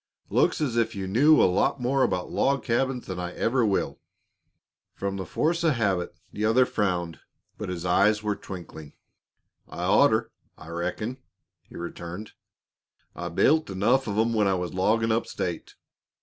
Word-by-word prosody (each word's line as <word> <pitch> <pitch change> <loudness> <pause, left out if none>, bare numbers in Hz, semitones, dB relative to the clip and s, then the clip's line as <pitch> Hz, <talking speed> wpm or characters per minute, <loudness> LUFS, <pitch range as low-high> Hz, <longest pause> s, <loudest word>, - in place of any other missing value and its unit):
"Looks - - +2
as 125 -6 -1
if 115 -1 +1
you 95 -1 -3
knew 135 +11 +5
a - - +6
lot 95 +9 +1
more 130 +2 +1
about 90 -7 0
log 140 -1 +1
cabins 125 +1 0
than 95 -1 -5
I 90 0 -4
ever 125 +1 +1
will." 100 -3 0 1.0
From 100 -1 -3
force 165 - 0
of 160 -3 +4
habit 95 -6 -1 0.2
the 105 - -3
other 115 +4 +4
frowned, 90 -7 -2 0.4
but - - -4
his 90 -1 -4
eyes 105 +4 +3
were 105 -1 0
twinkling. 80 -7 -9 0.8
"I'd 90 - -4
orter, 110 0 +4 0.3
I - - -12
reckon," 90 +9 -3 0.5
he - - -11
returned. 85 +4 -7 0.8
"I - - -5
built 155 -3 +3
enough 105 +8 +1
of 105 -1 -2
'em 115 +1 +2
when 105 -3 +2
I 95 - +2
was 90 -1 -3
loggin' 110 +5 +2
up 115 +1 0
state. 85 -2 -4
105 Hz, 165 wpm, -26 LUFS, 90-120 Hz, 1.0 s, a